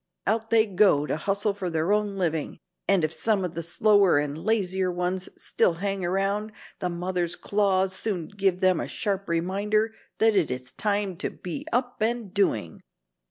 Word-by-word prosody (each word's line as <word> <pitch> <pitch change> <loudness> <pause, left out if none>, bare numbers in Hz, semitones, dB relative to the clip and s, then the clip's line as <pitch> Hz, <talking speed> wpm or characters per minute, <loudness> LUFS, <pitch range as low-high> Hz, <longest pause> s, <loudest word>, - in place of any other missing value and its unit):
Out 225 +1 0
they 225 -1 +5
go 190 -7 +3
to - - -1
hustle 200 +5 0
for 195 -3 -4
their 165 +4 +1
own 210 -1 0
living, 165 -5 -1 0.3
and 195 -4 +3
if 155 0 0
some 210 -2 +1
of 175 - -5
the 170 - -3
slower 195 +1 +4
and 145 0 -1
lazier 190 0 0
ones 180 +1 -2
still 175 - +1
hang 195 +1 -2
around, 195 +4 0 0.3
the 180 - -1
mother's 175 0 -1
claws 195 -2 +1
soon 190 -4 -2
give 195 -3 0
them 185 -2 +4
a - - -3
sharp 200 -2 -2
reminder 200 +6 0 0.2
that 220 -1 +4
it 185 -5 +2
is 125 0 -5
time 205 -3 -1
to - - -2
be 275 - -7
up 245 -1 -1
and 225 -3 -1
doing. 110 - 0
190 Hz, 175 wpm, -26 LUFS, 175-210 Hz, 0.3 s, they